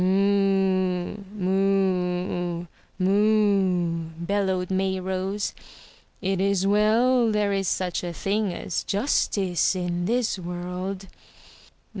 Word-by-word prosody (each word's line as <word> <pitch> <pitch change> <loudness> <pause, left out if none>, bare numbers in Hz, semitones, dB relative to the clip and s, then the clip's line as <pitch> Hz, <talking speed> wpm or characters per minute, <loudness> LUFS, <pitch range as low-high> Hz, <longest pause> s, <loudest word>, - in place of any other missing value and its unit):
"Moo, 190 -1 +2 0.2
moo, 180 -2 0 0.3
moo," 195 -4 +2
bellowed 190 0 -1
Mayrose. 190 +1 -1 0.7
"It 190 0 0
is 195 -1 +1
well 225 +4 +3
there 210 -1 +1
is 195 -1 -1
such 180 0 -1
a 175 - -3
thing 200 +3 -1
as 175 - -3
justice 195 - +1
in 175 -1 -2
this 230 -1 0
world." 180 +2 -5
190 Hz, 90 wpm, -25 LUFS, 180-200 Hz, 0.7 s, well